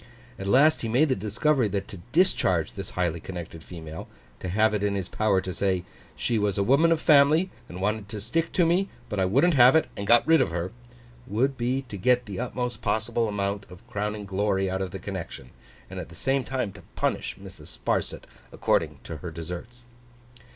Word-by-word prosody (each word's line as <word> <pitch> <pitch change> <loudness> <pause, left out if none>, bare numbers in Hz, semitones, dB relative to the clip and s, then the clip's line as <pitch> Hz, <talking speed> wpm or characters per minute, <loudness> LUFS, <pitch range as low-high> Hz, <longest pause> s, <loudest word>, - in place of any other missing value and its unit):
At 95 - -4
last 145 +9 +5
he 115 - -2
made 135 +7 +3
the 130 - +3
discovery 110 +6 +1
that 100 -1 -3
to 100 - -7
discharge 95 - +2
this 95 -2 -6
highly 85 -2 0
connected 85 -2 -8
female—to 80 +2 -9
have 110 +4 +3
it 105 - 0
in 100 -1 0
his 95 -3 -2
power 100 -2 +1
to 95 - -5
say, 95 -2 0 0.3
'She 115 -2 0
was 105 -1 0
a 100 - +2
woman 140 +9 +4
of 165 - +3
family, 155 +5 +5 0.2
and 90 - -7
wanted 105 0 -1
to 105 - -4
stick 140 +11 -1
to 175 - +4
me, 180 +4 +2 0.2
but 105 -3 -2
I 95 - +3
wouldn't 140 - +3
have 130 0 +7
it, 160 - +3
and 100 - -5
got 120 +1 +6
rid 165 0 +6
of - - +1
her'—would 120 +7 -4
be 130 +2 -1
to 115 -6 -8
get 125 +5 +2
the 100 -3 -6
utmost 125 -1 -3
possible 115 +1 0
amount 100 -1 -2
of 90 +6 -14
crowning 105 -2 -3
glory 95 -1 0
out 95 0 -2
of 95 - -2
the 95 - -6
connection, 95 -10 -7 0.4
and - - -7
at - - -7
the - - -12
same 135 0 0
time 125 -7 -3
to 100 - -13
punish - - -1
Mrs. - - -12
Sparsit - - -2 0.3
according - - 0
to 80 - -6
her 85 +3 -6
deserts. 90 +9 -8
105 Hz, 200 wpm, -26 LUFS, 95-125 Hz, 0.4 s, have